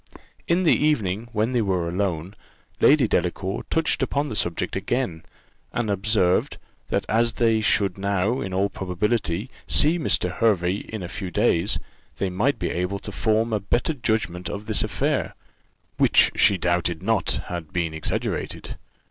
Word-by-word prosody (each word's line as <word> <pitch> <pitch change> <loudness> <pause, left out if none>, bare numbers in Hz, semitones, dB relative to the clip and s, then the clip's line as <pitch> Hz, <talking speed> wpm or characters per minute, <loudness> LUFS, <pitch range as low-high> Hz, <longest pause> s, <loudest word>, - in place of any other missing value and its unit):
In 175 +2 +2
the 165 - +5
evening, 115 -7 0
when 110 +1 0
they 125 -2 +2
were 95 -5 0
alone, 90 -1 -2 0.5
Lady - - +5
Delacour 95 +2 -1
touched 160 -1 +1
upon 145 +1 0
the 110 - -4
subject 90 -1 -1
again, 95 -3 -2 0.5
and 115 -3 -1
observed, 100 -2 +2 0.3
that - - 0
as 115 +1 +2
they 115 -2 +2
should 100 -3 +1
now, 100 +5 0
in 95 - -4
all 95 +2 +1
probability, 100 +2 -2 0.2
see 160 +4 +3
Mr. 90 - +1
Hervey 95 -5 +2
in 110 -4 -5
a - - -4
few 95 +1 -5
days, 85 +2 +2 0.4
they 95 -2 -1
might 120 +11 +1
be - - -2
able 90 +3 -2
to 100 - -7
form 110 +1 +1
a 105 - +1
better 120 - 0
judgment 110 - -1
of 100 +1 -6
this - - 0
affair, - - -1 0.6
which - - +5
she 100 0 +4
doubted 85 -1 0
not 110 +1 +1
had 85 -3 -6
been 85 -3 -1
exaggerated. 80 - -3
100 Hz, 155 wpm, -24 LUFS, 90-115 Hz, 0.6 s, the